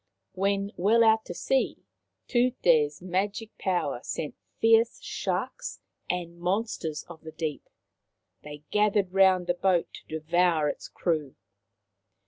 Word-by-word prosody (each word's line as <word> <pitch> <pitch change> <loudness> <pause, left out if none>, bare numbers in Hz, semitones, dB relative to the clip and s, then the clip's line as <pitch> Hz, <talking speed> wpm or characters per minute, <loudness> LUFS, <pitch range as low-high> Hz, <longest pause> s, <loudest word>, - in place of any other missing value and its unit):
When 200 +1 0
well 220 +6 +4
out 220 0 +4
to 175 - -7
sea 265 +7 0 0.4
Tute's 175 - +2
magic 200 +4 -2
power 175 -9 0
sent 150 - -4 0.3
fierce 225 +1 +4
sharks - - -3 0.3
and 170 -1 -3
monsters 180 -4 -2
of 170 -2 -12
the 160 - -9
deep. 155 -2 -5 0.7
They 150 0 -10
gathered 205 -3 +2
round 190 -2 +5
the 175 - +1
boat 180 -1 +1
to - - -12
devour 165 -1 +2
its - - -6
crew. 155 -6 -2
180 Hz, 120 wpm, -27 LUFS, 160-205 Hz, 0.7 s, round